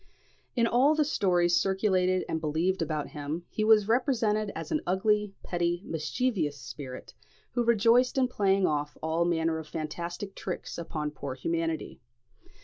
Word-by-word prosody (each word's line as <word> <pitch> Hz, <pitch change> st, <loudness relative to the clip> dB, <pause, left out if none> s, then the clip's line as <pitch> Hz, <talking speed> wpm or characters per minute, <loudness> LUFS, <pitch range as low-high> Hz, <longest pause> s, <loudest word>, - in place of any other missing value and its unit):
In 235 Hz, -2 st, +3 dB
all 260 Hz, +6 st, +4 dB
the 305 Hz, -1 st, +2 dB
stories 175 Hz, -, +2 dB
circulated 190 Hz, -2 st, +2 dB
and 160 Hz, -, -2 dB
believed 165 Hz, +5 st, 0 dB
about 155 Hz, -2 st, -2 dB
him, 150 Hz, +4 st, -5 dB
he 215 Hz, -, -1 dB
was 215 Hz, -2 st, +5 dB
represented 225 Hz, -4 st, +1 dB
as -, -, -6 dB
an 310 Hz, -, +1 dB
ugly, 210 Hz, +2 st, +1 dB
petty, 175 Hz, 0 st, -1 dB
mischievous 165 Hz, -, -1 dB
spirit, 130 Hz, +2 st, -8 dB, 0.4 s
who 240 Hz, -, 0 dB
rejoiced 235 Hz, +3 st, +4 dB
in 260 Hz, -1 st, +4 dB
playing 195 Hz, -5 st, +2 dB
off 150 Hz, -2 st, -1 dB
all 160 Hz, +2 st, +1 dB
manner 165 Hz, -1 st, +1 dB
of 160 Hz, -, -8 dB
fantastic 170 Hz, +5 st, -5 dB
tricks 185 Hz, -2 st, -5 dB
upon 155 Hz, -3 st, -3 dB
poor 140 Hz, -3 st, -6 dB
humanity. 165 Hz, +2 st, -2 dB
180 Hz, 145 wpm, -29 LUFS, 160-215 Hz, 0.4 s, was